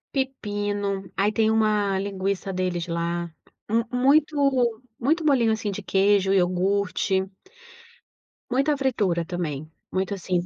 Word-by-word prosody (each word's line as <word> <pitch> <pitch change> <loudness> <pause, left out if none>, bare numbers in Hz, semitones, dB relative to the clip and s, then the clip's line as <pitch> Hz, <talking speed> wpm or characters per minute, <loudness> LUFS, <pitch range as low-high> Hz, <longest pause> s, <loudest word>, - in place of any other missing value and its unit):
Pepino. 205 -6 -2
Aí 200 +2 +3
tem 220 0 +2
uma 210 -3 +2
linguiça 195 0 -2
deles 180 -1 -2
lá. 170 0 -2 0.4
Mu 230 +2 +2
muito 270 -3 +2 0.2
muito 310 +6 +1
bolinho, 250 -7 +4
assim 220 -2 -1
de 195 +1 -6
queijo, 195 0 +3
iogurte. 190 +1 +1 1.2
Muita 275 +3 +1
fritura 205 -11 0
também. 155 -4 -4 0.2
Muito 190 +2 -1
assim, 185 -2 -1
200 Hz, 115 wpm, -25 LUFS, 185-235 Hz, 1.2 s, bolinho